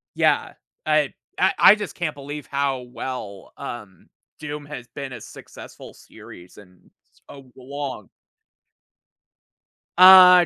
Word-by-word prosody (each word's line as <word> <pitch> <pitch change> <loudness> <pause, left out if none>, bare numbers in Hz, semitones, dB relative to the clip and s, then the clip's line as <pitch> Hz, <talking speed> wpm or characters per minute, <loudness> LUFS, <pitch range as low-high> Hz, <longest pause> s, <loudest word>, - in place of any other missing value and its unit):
Yeah, - - +1 0.3
I 155 -2 +1 0.2
I 190 +1 +3
I 200 - +8
just 210 -1 -6
can't 155 -4 -4
believe 145 +1 -8
how 140 -2 -1
well, 105 -7 -7
um, 105 -7 -9 0.3
Doom 150 0 -7
has 125 -4 -9
been 140 -2 -6
a 120 - -8
successful - - -13
series 90 +1 -15
and 90 -3 -19 0.4
so 135 -3 -14
long. 140 +1 -7 1.9
Uh, 180 -1 +9
140 Hz, 115 wpm, -22 LUFS, 125-155 Hz, 1.9 s, Uh